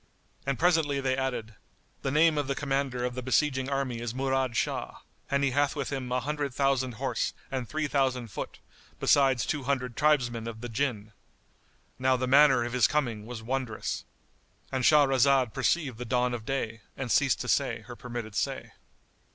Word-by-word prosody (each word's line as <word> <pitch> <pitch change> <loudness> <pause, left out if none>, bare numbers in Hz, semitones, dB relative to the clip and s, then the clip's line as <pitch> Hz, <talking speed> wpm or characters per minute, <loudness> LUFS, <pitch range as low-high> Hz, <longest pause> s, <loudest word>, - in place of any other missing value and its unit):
And 140 -2 0
presently 160 -5 +2
they 130 -1 0
added, 125 -4 -3 0.5
"The - - -1
name 155 +3 +4
of 145 - -2
the 140 - -1
commander 135 -3 -1
of 125 - -2
the 125 - -4
besieging 130 +1 +1
army 135 -4 -1
is 120 0 -4
Murad 130 -3 0
Shah - - -2 0.3
and 140 0 +1
he 140 - +2
hath 145 +2 +1
with 140 -2 -3
him 130 -3 -4
an 125 0 +1
hundred 145 -3 -2
thousand 135 -2 +1
horse 130 +3 -2 0.2
and 130 -4 -3
three 155 +1 -1
thousand 130 -4 0
foot, - - -6 0.4
besides 135 -4 +4
two 145 -4 -2
hundred 125 -3 -1
tribesmen 120 -6 +1
of 110 -1 -7
the 120 - -5
Jinn." 110 -4 -2 0.9
Now 130 0 +3
the 130 - -1
manner 135 -1 +6
of 120 0 -4
his 125 -3 +4
coming 120 -8 -1
was 120 -2 -7
wondrous.——And 130 +1 -5
Shahrazad 135 -4 +4
perceived 140 -9 0
the 125 - -4
dawn 125 +1 +1
of 110 -2 -6
day 115 -5 -2 0.2
and 130 -3 -3
ceased 140 -3 +3
to - - -5
say - - +1
her - - -10
permitted 120 -3 -6
say. - - -2
130 Hz, 175 wpm, -28 LUFS, 120-140 Hz, 0.9 s, manner